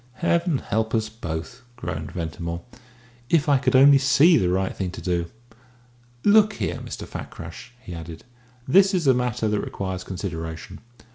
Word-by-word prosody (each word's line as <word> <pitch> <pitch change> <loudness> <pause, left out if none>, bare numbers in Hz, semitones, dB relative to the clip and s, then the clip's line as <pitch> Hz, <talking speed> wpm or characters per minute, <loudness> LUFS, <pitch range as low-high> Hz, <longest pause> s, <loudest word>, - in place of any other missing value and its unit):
"Heaven 170 +3 +1
help 110 -1 -1
us 110 -1 0
both!" 90 +1 -6
groaned 80 -9 -5
Ventimore. 85 0 -5 0.7
"If 160 -2 +3
I 140 -2 +4
could 130 -1 +1
only 140 +1 +8
see 145 +5 +5
the 90 - +2
right 95 +1 0
thing 95 -2 -3
to - - -7
do. 85 -2 -1 1.0
Look 210 0 +5
here, - - -3
Mr. - - -7
Fakrash," 85 +8 -9
he 90 -8 -9
added, 80 -1 -8 0.4
"this 195 +7 +5
is 175 -4 0
a 135 - +6
matter 125 -3 -1
that 105 -1 0
requires 95 -1 -4
consideration. 80 -4 -6
110 Hz, 155 wpm, -24 LUFS, 85-140 Hz, 1.0 s, only